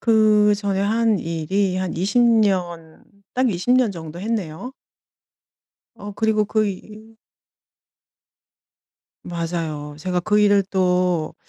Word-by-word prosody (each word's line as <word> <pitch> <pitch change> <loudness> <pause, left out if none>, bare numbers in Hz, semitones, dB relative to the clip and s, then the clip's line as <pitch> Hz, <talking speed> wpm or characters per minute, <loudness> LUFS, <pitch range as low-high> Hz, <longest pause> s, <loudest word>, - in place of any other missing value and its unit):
그 215 -2 +4
전에 200 -2 -2
한 220 +1 +1
일이 180 +4 -1
한 185 -1 -3
20 195 +7 +1
년 185 -8 0 0.3
딱 255 0 +2
20 185 +5 -3
년 255 -4 +3
정도 165 -2 -8
했네요. 215 +1 -4 1.2
어 205 0 -9
그리고 215 +1 +1
그 215 +1 0
일 215 +3 -9 2.1
맞아요. 165 -4 -4
제가 180 +2 -2
그 210 +3 +1
일을 205 -1 +4
또 180 -3 0
195 Hz, 155 characters per minute, -21 LUFS, 175-215 Hz, 2.1 s, 그